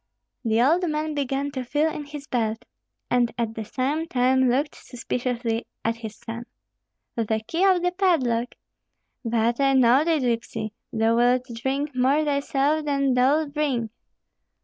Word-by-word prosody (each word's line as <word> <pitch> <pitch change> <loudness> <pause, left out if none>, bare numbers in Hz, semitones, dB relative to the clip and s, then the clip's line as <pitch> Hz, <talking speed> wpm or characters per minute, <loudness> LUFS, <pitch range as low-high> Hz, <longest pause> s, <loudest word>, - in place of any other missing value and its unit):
The 225 -1 +1
old 335 +6 +3
man 305 0 -2
began 280 0 -2
to 260 -2 -4
feel 295 +5 +1
in 295 - -6
his 290 -1 -8
belt, 225 -3 -2 0.5
and 245 -1 +3
at 230 -2 -1
the 225 - -5
same 280 +8 -2
time 260 -1 +3
looked 280 +4 0
suspiciously 240 -1 -3 0.2
at 230 +1 0
his 220 -2 -7
son. 235 +1 -8 0.7
"The 220 -2 0
key 335 +9 -1
of 370 -2 +4
the 360 - +2
padlock? 265 -11 +1 0.7
But 235 +1 +1
I 275 -1 +3
know 260 +2 +5
thee, 330 0 +2
gypsy; 230 -4 -2 0.2
thou 225 +1 +2
wilt 245 +1 +3
drink 270 +4 -2
more 270 +5 +2
thyself 285 +1 +1
than 275 -2 +1
thou'lt 285 +4 +2
bring. 265 -7 -1
260 Hz, 150 wpm, -24 LUFS, 235-295 Hz, 0.7 s, know